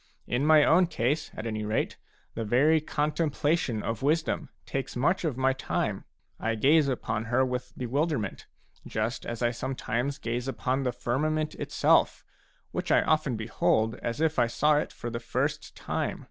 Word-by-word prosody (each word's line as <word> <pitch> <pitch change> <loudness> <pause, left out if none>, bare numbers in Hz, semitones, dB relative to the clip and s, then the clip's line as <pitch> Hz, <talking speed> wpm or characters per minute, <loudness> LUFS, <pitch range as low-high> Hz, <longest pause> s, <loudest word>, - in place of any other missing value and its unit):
In 130 +5 0
my 155 -1 +7
own 180 +4 +5
case, 145 0 -1
at 110 - -6
any 110 -2 -2
rate, 105 +1 -1 0.4
the 115 - -3
very 145 +9 +4
contemplation 150 -5 0
of 115 0 -3
wisdom 155 +1 0 0.2
takes 135 -1 -4
much 160 +10 +1
of 150 -7 -1
my 130 0 +3
time; 130 - -2 0.3
I 115 0 0
gaze 145 +6 +4
upon 115 -4 -2
her 125 +3 +2
with 125 -1 -4
bewilderment, 130 - -2 0.4
just 110 +3 -2
as 120 0 -4
I 120 - +3
some 130 +3 -4
times 125 +4 -2
gaze 120 0 -3
upon 135 0 -1
the 130 -2 0
firmament 155 +6 -1
itself, - - +2 0.5
which - - -3
I - - +5
often 155 -5 +1
behold 110 0 +1
as 120 +4 -3
if 160 -3 +1
I 120 - +4
saw 150 +5 +3
it - - -1
for 120 - -6
the 115 - -3
first 115 - -2
time. - - -2
130 Hz, 170 wpm, -28 LUFS, 115-150 Hz, 0.5 s, my